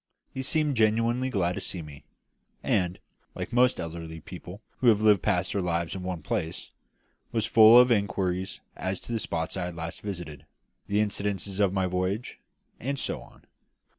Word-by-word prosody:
He 130 - -3
seemed 150 +1 +1
genuinely 115 +4 +2
glad 90 -7 0
to - - -5
see 90 -3 -5
me; 70 -2 -12 0.6
and, 90 -1 +1 0.4
like - - -5
most 125 +1 +4
elderly 80 -1 -6
people 90 +5 -10 0.2
who 125 - +2
have 105 -3 +5
passed 95 -3 +1
their 100 - 0
lives 85 -2 -1
in 95 - -5
one 90 -3 -4
place, 80 +2 -3 0.6
was 110 -2 0
full 110 +1 +8
of 125 0 +6
inquiries 95 -3 0
as 95 0 -3
to - - -9
the 115 - 0
spots 80 -5 -3
I 95 -2 -2
had 90 -1 -6
last 85 0 -5
visited, 80 -7 -7 0.4
the 100 +1 +1
incidents 100 -2 -1
of 100 -3 +4
my 95 -1 +1
voyage, 95 +5 -2 0.4
and 140 +3 -2
so - - -3
on. - - -17
95 Hz, 170 wpm, -27 LUFS, 90-110 Hz, 0.6 s, full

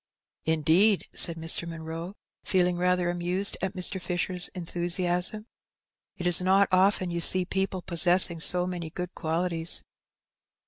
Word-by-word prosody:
" - - -47
Indeed! 175 +7 +3
" - - -50
said 170 - +2
Mr. 165 +1 -1
Munroe, 165 +3 -7 0.3
feeling 180 -2 +1
rather 180 0 +1
amused 180 +3 +1
at 190 -1 -3
Mr. 185 +1 0
Fisher's 180 0 0
enthusiasm. 180 +3 -2 0.4
" - - -56
It 180 - -6
is 175 0 +5
not 195 +2 +3
often 185 -1 +2
you 170 0 -3
see 185 +2 +2
people 190 0 -3
possessing 175 0 +2
so 180 +2 +2
many 175 -3 -5
good 180 +2 -6
qualities." 165 0 0
180 Hz, 145 wpm, -26 LUFS, 170-185 Hz, 0.4 s, is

